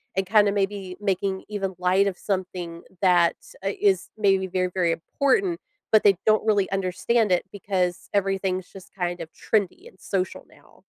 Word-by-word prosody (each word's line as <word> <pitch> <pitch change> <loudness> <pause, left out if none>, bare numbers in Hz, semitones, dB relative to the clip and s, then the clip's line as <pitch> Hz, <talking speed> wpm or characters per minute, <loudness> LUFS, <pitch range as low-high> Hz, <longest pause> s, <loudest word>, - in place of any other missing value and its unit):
and 190 0 0
kinda 205 0 +5
maybe 195 -2 -2
making 195 -1 -1
even 195 -2 -3
light 185 +2 +3
of 190 -3 -3
something 180 -3 -4 0.2
that's, 175 -3 +2
uh 195 - +1
is 195 -3 +2
maybe 195 -3 +3
very, 185 0 0
very 175 -3 +2
important, 335 - 0 0.3
but 215 - +5
they 200 -1 +6
don't 215 0 +4
really 205 -3 +2
understand 195 +3 +1
it 180 - +2
because 185 -3 -2
everything's 195 -2 -1
just 190 -2 -13
kind 175 -1 -2
of 160 - -8
trendy 205 -5 -1
and 185 - -18
social 185 -1 -3
now. - - -22
190 Hz, 165 wpm, -25 LUFS, 185-205 Hz, 0.3 s, they